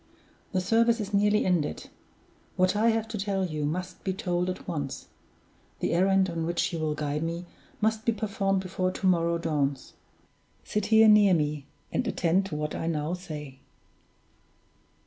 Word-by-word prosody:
"The 185 Hz, -, 0 dB
service 230 Hz, +4 st, +3 dB
is 205 Hz, -1 st, -5 dB
nearly 210 Hz, +1 st, +3 dB
ended. 175 Hz, -5 st, -1 dB, 0.6 s
What 185 Hz, +2 st, +2 dB
I 220 Hz, +3 st, +3 dB
have 225 Hz, -1 st, 0 dB
to 220 Hz, -, -4 dB
tell 195 Hz, -1 st, 0 dB
you 155 Hz, -4 st, -3 dB
must 180 Hz, +4 st, -4 dB
be 190 Hz, -, -1 dB
told 180 Hz, -1 st, -1 dB
at 185 Hz, -, -6 dB
once; 145 Hz, -6 st, -4 dB, 0.7 s
the -, -, -1 dB
errand 190 Hz, +2 st, +3 dB
on 170 Hz, -2 st, -3 dB
which 170 Hz, +1 st, 0 dB
you 165 Hz, -, -2 dB
will 155 Hz, -1 st, -1 dB
guide 150 Hz, 0 st, -2 dB
me 170 Hz, +2 st, -3 dB, 0.4 s
must 220 Hz, 0 st, +1 dB
be 230 Hz, -, +2 dB
performed 200 Hz, -3 st, -1 dB
before 185 Hz, 0 st, -1 dB
to 185 Hz, -, -5 dB
morrow 170 Hz, -2 st, +3 dB
dawns. 145 Hz, -5 st, -2 dB, 0.7 s
Sit 210 Hz, -1 st, -2 dB
here 220 Hz, 0 st, +6 dB
near 210 Hz, -3 st, +6 dB
me, 150 Hz, -2 st, -2 dB, 0.2 s
and 250 Hz, -, -1 dB
attend 190 Hz, -1 st, +1 dB
to 155 Hz, -, -5 dB
what 150 Hz, 0 st, -3 dB
I 165 Hz, -, -3 dB
now 155 Hz, 0 st, -1 dB
say!" 150 Hz, -7 st, -7 dB
180 Hz, 165 wpm, -27 LUFS, 160-200 Hz, 0.7 s, here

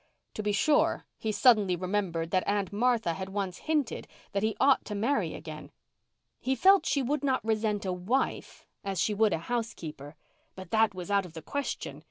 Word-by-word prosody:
To -, -, -4 dB
be 210 Hz, 0 st, 0 dB
sure, 295 Hz, +9 st, +2 dB
he 220 Hz, -, -1 dB
suddenly 210 Hz, -5 st, +4 dB
remembered 180 Hz, -3 st, -2 dB
that 185 Hz, -1 st, +1 dB
Aunt 200 Hz, -2 st, 0 dB
Martha 225 Hz, -5 st, +2 dB
had 190 Hz, +3 st, -5 dB
once 195 Hz, -2 st, -3 dB
hinted 295 Hz, -7 st, 0 dB, 0.2 s
that 200 Hz, -, -1 dB
he 220 Hz, 0 st, 0 dB
ought 275 Hz, 0 st, +4 dB
to 210 Hz, -, -5 dB
marry 235 Hz, +8 st, 0 dB
again. -, -, -9 dB, 0.7 s
He 265 Hz, +1 st, 0 dB
felt 390 Hz, +6 st, +5 dB
she 280 Hz, -, +1 dB
would 290 Hz, +3 st, -1 dB
not 260 Hz, -4 st, 0 dB
resent 215 Hz, -2 st, 0 dB
a 185 Hz, -, -1 dB
wife 200 Hz, +10 st, -2 dB, 0.2 s
as 195 Hz, -2 st, -3 dB
she 210 Hz, -, +1 dB
would 215 Hz, 0 st, +3 dB
a -, -, +1 dB
housekeeper. 165 Hz, -, -5 dB, 0.4 s
But 185 Hz, -2 st, -10 dB
that 220 Hz, -3 st, +3 dB
was 185 Hz, +2 st, -6 dB
out 200 Hz, -2 st, +2 dB
of 165 Hz, -, -16 dB
the 160 Hz, -2 st, -8 dB
question. 285 Hz, +7 st, -4 dB
205 Hz, 190 wpm, -29 LUFS, 185-245 Hz, 0.7 s, felt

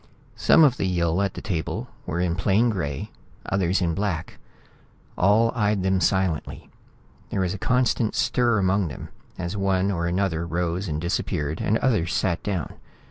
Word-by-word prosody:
Some 160 Hz, -, +5 dB
of 135 Hz, -5 st, +4 dB
the 95 Hz, -, 0 dB
Yill 85 Hz, 0 st, +1 dB
at 100 Hz, -2 st, -1 dB
the -, -, -7 dB
table 85 Hz, -6 st, -3 dB, 0.2 s
were 80 Hz, -, -2 dB
in 90 Hz, -1 st, +1 dB
plain 105 Hz, +6 st, +2 dB
gray, 70 Hz, -9 st, -4 dB, 0.3 s
others 95 Hz, -1 st, +1 dB
in 85 Hz, -1 st, +1 dB
black. 90 Hz, -4 st, -3 dB, 0.8 s
All 110 Hz, +5 st, +3 dB
eyed 105 Hz, -4 st, +1 dB
them 95 Hz, -1 st, +1 dB
silently. 95 Hz, -3 st, -1 dB, 0.6 s
There 95 Hz, -, -1 dB
was 90 Hz, 0 st, 0 dB
a 100 Hz, -, -6 dB
constant 125 Hz, -2 st, +1 dB
stir 120 Hz, -2 st, +2 dB
among 95 Hz, -1 st, +2 dB
them 75 Hz, -, -8 dB, 0.3 s
as 90 Hz, +2 st, -4 dB
one 95 Hz, -1 st, +1 dB
or 85 Hz, -2 st, -1 dB
another 85 Hz, -2 st, -1 dB
rose 85 Hz, +3 st, -2 dB
and 75 Hz, -2 st, -2 dB
disappeared 80 Hz, -3 st, -2 dB
and 110 Hz, -, +2 dB
others 100 Hz, -8 st, +1 dB
sat 95 Hz, -4 st, 0 dB
down. 95 Hz, -7 st, -3 dB
95 Hz, 165 wpm, -24 LUFS, 85-100 Hz, 0.8 s, Some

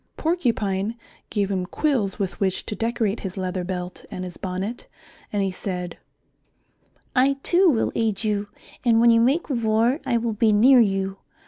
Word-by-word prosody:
Porcupine 230 Hz, -, 0 dB, 0.3 s
gave 200 Hz, -2 st, -1 dB
him 185 Hz, -2 st, -1 dB
quills 235 Hz, -8 st, 0 dB
with 195 Hz, -2 st, -3 dB
which 190 Hz, -2 st, 0 dB
to 210 Hz, -, -4 dB
decorate 225 Hz, -2 st, -1 dB
his 190 Hz, 0 st, -6 dB
leather 185 Hz, -1 st, -2 dB
belt 180 Hz, 0 st, -5 dB
and 185 Hz, -, -6 dB
his 180 Hz, -2 st, -7 dB
bonnet, 190 Hz, +5 st, -5 dB, 0.4 s
and 205 Hz, -1 st, 0 dB
he 195 Hz, -, 0 dB
said, 180 Hz, -2 st, -5 dB, 1.2 s
"I 265 Hz, +2 st, +4 dB
too 365 Hz, +1 st, +4 dB
will 235 Hz, -7 st, +1 dB
aid 220 Hz, -2 st, -1 dB
you, 210 Hz, -1 st, -1 dB, 0.4 s
and 230 Hz, -2 st, +4 dB
when 235 Hz, 0 st, +6 dB
you 230 Hz, 0 st, +5 dB
make 275 Hz, +8 st, +2 dB
war 235 Hz, 0 st, +1 dB
I 235 Hz, -, +1 dB
will 230 Hz, -1 st, -1 dB
be 215 Hz, +1 st, +3 dB
near 250 Hz, +5 st, +6 dB
you. 195 Hz, -3 st, +1 dB
210 Hz, 165 wpm, -23 LUFS, 190-235 Hz, 1.2 s, when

